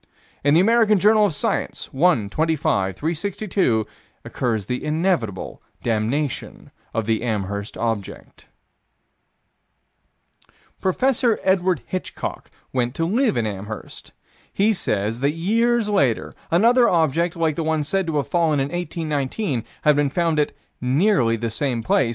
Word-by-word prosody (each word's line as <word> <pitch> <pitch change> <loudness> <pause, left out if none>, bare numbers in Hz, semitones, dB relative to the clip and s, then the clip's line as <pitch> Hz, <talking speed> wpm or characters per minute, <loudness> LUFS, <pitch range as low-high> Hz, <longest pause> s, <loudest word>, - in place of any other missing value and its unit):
In 145 +1 +4
the - - +6
American 220 +1 +4
Journal 210 +2 +5
of 180 - -3
Science, - - -2
1 145 - +3
25 135 - 0
362, 170 - -1 0.4
occurs 115 -6 -2
the 125 +4 -3
inevitable 150 - -1 0.2
damnation 120 +5 -2 0.2
of 115 - -2
the 110 0 0
Amherst 100 -3 -3
object: 115 -4 -4 2.3
Prof. 250 +8 +1 0.2
Edward 185 -1 +2
Hitchcock 185 - -5 0.2
went 125 0 -1
to 165 - 0
live 225 - +1
in 115 - +1
Amherst. 105 +1 -7 0.4
He 210 +3 +2
says 110 - -1
that 140 +3 +1
years 230 +6 +1
later, 140 - +1 0.2
another 235 +7 +4
object, 165 +1 +1
like 165 -3 0
the 165 - -2
one 160 -1 0
said 190 +5 -1
to 160 -2 -1
have 145 - -1
fallen 165 -4 +2
in 135 +1 -1
1819, 155 - -2 0.2
had 150 -1 +5
been 145 -1 +2
found 165 +1 +1
at 150 - 0 0.3
"nearly 130 - +2
the 115 0 -3
same 120 -1 -1
place." 120 +1 +2
155 Hz, 135 wpm, -22 LUFS, 115-185 Hz, 2.3 s, the